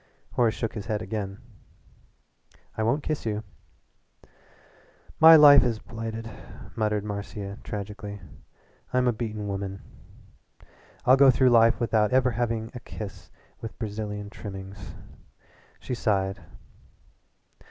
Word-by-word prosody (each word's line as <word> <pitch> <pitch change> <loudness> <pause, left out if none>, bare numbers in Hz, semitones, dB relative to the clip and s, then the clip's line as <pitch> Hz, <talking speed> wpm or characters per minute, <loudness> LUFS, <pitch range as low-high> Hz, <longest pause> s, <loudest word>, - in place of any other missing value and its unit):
Horace 120 -2 +2
shook 115 - -3
his 105 -2 -6
head 105 -2 -2
again. 100 -3 -4 1.4
"I - - -3
won't 120 +7 +1
kiss 155 -2 -2
you." 110 -1 -2 1.8
"My 160 +1 +10
life 145 -2 +9
is 120 -3 0
blighted," 115 0 -6 0.5
muttered 105 -2 0
Marcia 100 -1 -6
tragically. 105 0 -6 0.7
"I'm 125 0 +2
a 120 - +3
beaten 110 -2 -4
woman. 100 0 -5 1.2
I'll 130 +1 +6
go 140 0 +7
through 130 0 +4
life 115 0 +5
without 110 -3 +1
ever 130 0 +3
having 115 -1 -2
a 125 - -7
kiss 105 -3 -9 0.3
with 115 - -7
Brazilian 105 -2 -5
trimmings." 95 -1 -9 0.8
She - - -5
sighed. 95 -4 0
110 Hz, 115 wpm, -26 LUFS, 105-120 Hz, 1.8 s, My